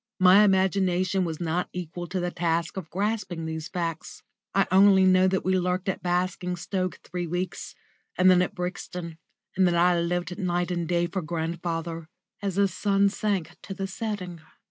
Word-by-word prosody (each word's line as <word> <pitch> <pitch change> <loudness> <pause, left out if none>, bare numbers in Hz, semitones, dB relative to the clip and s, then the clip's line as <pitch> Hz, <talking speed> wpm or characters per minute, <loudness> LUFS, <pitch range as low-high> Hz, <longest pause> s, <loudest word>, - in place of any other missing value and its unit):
My 190 +2 +7
imagination 190 -1 +2
was 160 -2 -4
not 175 +1 -1
equal 175 0 -5
to 185 +2 -3
the 175 0 -2
task 170 -1 -1
of 185 -5 -6
grasping 195 -3 -2
these 160 -1 -4
facts. 170 -3 -5 0.3
I 195 -1 +4
only 190 0 +6
know 185 0 +5
that 190 0 0
we 185 0 +2
lurked 180 +2 -1
at 190 - -2
Basingstoke 180 +1 -2
three 175 -1 -4
weeks, 180 +3 -4 0.4
and 185 - +4
then 180 -1 +5
at 180 - -2
Brixton; 180 -2 -5 0.4
and 190 -1 +4
that 175 - +1
I 175 0 +4
lived 175 +2 -2
night 175 -1 -1
and 175 -2 -2
day 175 0 +1
for 190 +2 -3
grandfather, 165 0 -4 0.3
as 195 -3 -2
his 200 -1 +2
sun 200 -1 +2
sank 195 -5 -2
to 195 - -7
the 195 0 -3
setting. 190 -4 -5
180 Hz, 170 wpm, -26 LUFS, 170-190 Hz, 0.4 s, My